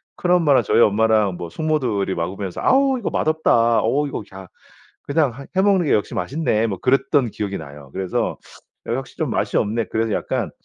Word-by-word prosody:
큰엄마랑 175 -6 +3
저희 - - +2
엄마랑 105 -3 +3
뭐 85 -1 -6
숙모들이 125 - -1
먹으면서 95 +2 -4
"아우 270 0 +3
이거 210 - -2
맛없다. 120 -8 +2
어 140 +6 +1
이거 120 - -5
야 95 -1 -10 0.6
그냥 145 -3 +1
하 135 +3 -10
해 190 - +4
먹는 195 -5 +3
게 - - +2
역시 105 - 0
맛있네." 115 - 0
뭐 100 -4 -4
그랬던 135 - +2
기억이 100 -2 -4
나요. 70 -2 -11
그래서 95 -1 -2 0.5
'역시 130 +3 -4
좀 - - -2
맛이 - - -1
없네.' 110 +2 0
그래서 110 -1 -1
약간 - - -2
115 Hz, 365 characters per minute, -21 LUFS, 100-150 Hz, 0.6 s, 해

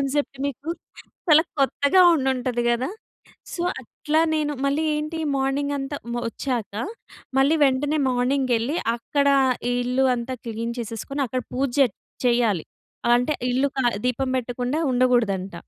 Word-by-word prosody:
Concept 275 0 -1
మీకు. 280 +3 -6 0.6
చాలా 310 +1 +7 0.2
కొత్తగా 285 +6 +4
ఉండుంటది 255 -3 0
గద. 240 +1 +1 0.7
సో 345 - -3 0.2
అట్లా 300 +5 -1
నేను 300 -1 0
మళ్ళీ 280 +3 +1
ఏంటి 305 +2 -3 0.2
మార్నింగ్ 275 +2 0
అంతా 275 +1 -4 0.2
మ్ 240 - -2
ఒచ్చాక 235 -5 -3 0.6
మళ్ళీ 280 +4 +4
వెంటనే 285 +3 +1
మార్నింగ్ 255 +2 +1
వెళ్లి, 235 +8 0 0.2
అక్కడ 280 +4 0 0.4
ఈ - - +1
ఇల్లు 250 +2 +1
అంతా 245 +2 -4
క్లీన్ 230 +1 -3
చేసేసుకొని 235 +5 -4
అక్కడ 255 +1 -2
పూజ 270 +2 0
జె 270 - +7 0.4
చెయ్యాలి. 235 -8 +2 0.5
అంటే 250 +5 +1 0.2
ఇల్లు 265 +3 +2
క - - -4 0.3
దీపం 255 +1 0
పెట్టకుండా 250 +3 -2
ఉండకూడదంట. 235 -7 +1
260 Hz, 135 wpm, -23 LUFS, 240-285 Hz, 0.7 s, చాలా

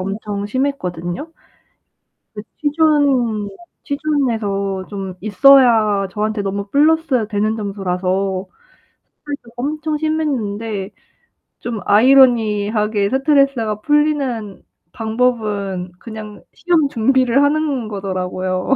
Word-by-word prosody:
엄청 200 +1 -4
심했거든요. 235 - -3 1.0
그 210 - -7 0.2
취준 285 -8 +2 0.4
취준에서 220 -10 -1
좀 195 -3 -6
있어야 220 -3 +5
저한테 215 0 -2
너무 200 +1 -3
플러스 295 -5 +2
되는 215 +1 0
점수라서 190 -1 -2 0.7
스트레스가 285 -5 -8
엄청 300 +4 -2
심했는데 225 -10 -2 0.7
좀 230 -3 -4
아이러니하게 215 -4 +3
스트레스가 270 -6 +1
풀리는 275 -8 0 0.3
방법은 215 -6 -1
그냥 215 -1 -9
시험 330 -5 +1
준비를 260 +1 +2
하는 285 -5 0
거더라고요. 185 -2 -3
220 Hz, 240 characters per minute, -18 LUFS, 200-275 Hz, 1.0 s, 있어야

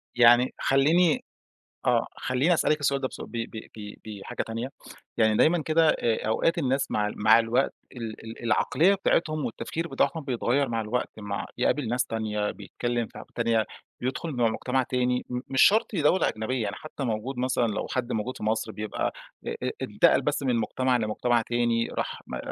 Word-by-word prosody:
يعني 120 +1 +6
خلّيني 155 +5 +3 0.6
آه، - - +3
خلّيني 130 +8 +2
أسألِك 155 -2 +2
السؤال 140 -1 +1
ده 130 - 0
بس - - -10
ب - - -9 0.2
ب 110 - -7 0.2
ب 105 -1 -7 0.3
بحاجة - - -4
تانية. 115 +3 -4 0.5
يعني 110 -2 +3
دايمًا 170 +1 +4
كده، 160 +1 +3
آآ، 115 -6 0
أوقات 165 +10 +1
الناس 135 -3 0
مع 105 0 0
مع 110 +2 +6
الوقت، 115 +4 +1 0.2
ال 115 -3 -7
ال 115 +1 -9
العقليّة 150 - +3
بتاعتهم 155 -6 +1
والتفكير 160 +7 -4
بتاعهم 140 +2 0
بيتغيّر 130 +1 0
مع 115 -1 -1
الوقت، 110 +3 -2
مع 105 0 -4
يقابل 145 -5 +1
ناس 125 +2 +1
تانية، 105 -2 -2
بيتكلّم 120 +4 -3
في - - -14
ح - - -8
تانية، 115 -2 +2 0.4
بيدخُل 135 +6 -2
مع 120 -4 +2
مجتمع 125 +3 0
تاني، 125 0 0
م 125 - -2
مش 135 -1 +2
شرط 215 +1 +4
دولة 165 +3 +3
أجنبيّة، 110 +3 -2
يعني 100 -2 -3
حتى 155 -2 -7
موجود 120 +2 -2
مثلًا، 125 -1 +1
لو 105 - -2
حد 125 -1 -2
موجود 115 +4 -3
في - - -8
مصر، 110 +1 0
بيبقى 105 0 -3 0.3
أ - - -3 0.2
أ - - 0
إنتقل - - +3
بس - - -1
من 130 -3 +1
مجتمع 125 +3 +1
لمجتمع 115 +2 +1
تاني، 120 0 0
راح - - -4
م - - -4
125 Hz, 180 wpm, -27 LUFS, 110-135 Hz, 0.6 s, يعني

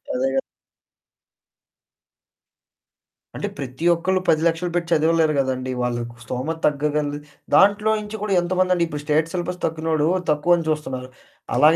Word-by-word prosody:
అదే 260 +1 +1
గదా. 270 - +2 3.0
అంటే 205 - -2
ప్రతి 130 +3 -5
ఒక్కళ్ళు 185 +3 0
10,00,000 165 +2 +2
పెట్టి 175 -1 -1
చదవలేరు 160 0 +3
గదండి. 130 -1 -1
వాళ్ళకు 120 -1 -3
స్తోమత 130 +8 -3
తగ్గగలది 145 0 0 0.4
దాంట్లో 205 +2 +5
నుంచి 210 +1 -6
గూడా 210 -2 -1
ఎంతమందండి 185 0 +1
ఇప్పుడు 150 -2 -5
స్టేట్ 155 +2 +1
సిలబస్ 180 0 -3
తక్కినోడు 160 -1 0 0.2
తక్కువని 165 +3 +2
చూస్తున్నారు. 130 -5 -3 0.5
అలాగ 155 +2 +6
160 Hz, 115 wpm, -22 LUFS, 145-175 Hz, 3.0 s, అలాగ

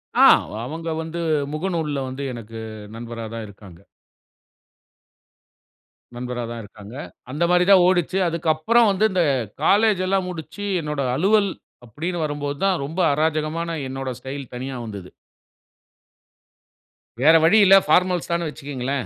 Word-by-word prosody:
ஆ. - - +7 0.2
அவ - - -12
அவங்க 165 +5 -5
வந்து 165 +1 -5 0.3
முகநூல்ல 155 -4 -2
வந்து 135 +2 -6
எனக்கு 115 -1 -9 0.4
நண்பரா 115 0 -7
தான் 115 -1 -5
இருக்காங்க. 100 -4 -14 2.4
நண்பரா 125 0 -4
தான் 115 -1 -6
இருக்காங்க. 105 +3 -12 0.4
அந்தமாரி 170 +4 +2
தான் 185 -2 +7
ஓடுச்சு. 185 0 +1
அதுக்கப்பறம் 170 +8 +2
வந்து 195 +2 +2
இந்த 180 -2 +2 0.4
காலேஜ் 210 -2 +4
எல்லாம் 190 -1 0
முடிச்சு, 165 +3 -7 0.2
என்னோட 150 -2 -3
அலுவல் 200 +6 +3 0.4
அப்படீன்னு 165 +7 -4
வரும்போது 145 -1 -4
தான், 190 -2 +2
ரொம்ப 160 +6 -6
அராஜகமான 160 +2 -1
என்னோட 135 0 -4
ஸ்டைல் 135 0 -7
தனியா 130 +1 -5
வந்தது. 100 -4 -8 2.1
வேற 160 +3 +6
வழி 165 +7 +5
இல்ல. 195 0 +8
ஃபார்மல்ஸ் 180 -1 +2
தானு 170 -1 0
வச்சுக்கங்களேன். 140 -3 -4
155 Hz, 125 wpm, -22 LUFS, 130-180 Hz, 2.4 s, இல்ல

